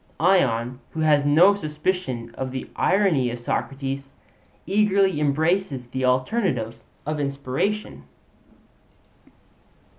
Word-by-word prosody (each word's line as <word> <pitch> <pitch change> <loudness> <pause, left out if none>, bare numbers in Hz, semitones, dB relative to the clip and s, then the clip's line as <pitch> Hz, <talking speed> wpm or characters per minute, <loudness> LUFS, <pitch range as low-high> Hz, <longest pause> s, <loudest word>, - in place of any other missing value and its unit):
Ion, 130 -9 +2
who 160 - -3
has 150 -2 +3
no 165 +7 +6
suspicion 150 -8 -3
of 130 +2 -4
the 130 0 -5
irony 180 -11 +2
of 120 - -4
Socrates, 135 +2 -4 0.5
eagerly 195 -4 +2
embraces 150 -2 0
the 130 +1 -2
alternative 130 - 0 0.3
of 150 +1 -2
inspiration. 140 +9 -2
145 Hz, 95 wpm, -24 LUFS, 130-185 Hz, 0.5 s, no